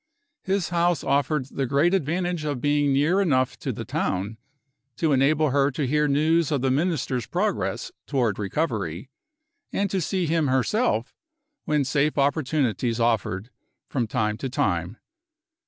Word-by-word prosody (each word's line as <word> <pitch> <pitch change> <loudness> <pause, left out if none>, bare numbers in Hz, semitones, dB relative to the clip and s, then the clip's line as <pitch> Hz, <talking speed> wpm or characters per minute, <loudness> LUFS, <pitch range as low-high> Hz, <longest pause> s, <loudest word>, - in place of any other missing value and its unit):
His 190 -3 -1
house 175 -2 +1
offered 140 0 +1
the 135 0 -3
great 140 +7 +2
advantage 175 0 0
of 145 -4 -2
being 145 +1 +2
near 155 +8 +3
enough 130 -9 +1
to - - -3
the - - -6
town 100 +4 -2 0.6
to 160 -2 +1
enable 145 +2 +3
her 140 0 +3
to 145 +1 -2
hear 150 +3 +2
news 155 +3 +2
of 140 -4 +1
the 130 0 +1
Minister's 140 -5 0
progress - - -1 0.2
toward 120 -8 0
recovery, 105 - -2 0.6
and 200 -1 -1
to 190 - 0
see 185 +2 -1
him 160 -1 +1
herself 130 - +1 0.5
when 150 -2 +1
safe 150 +3 +1
opportunities 135 -5 +1
offered, 115 -2 0 0.4
from 125 -5 -1
time 110 -2 -1
to 130 +3 -4
time. 90 -3 -1
140 Hz, 145 wpm, -25 LUFS, 125-155 Hz, 0.6 s, near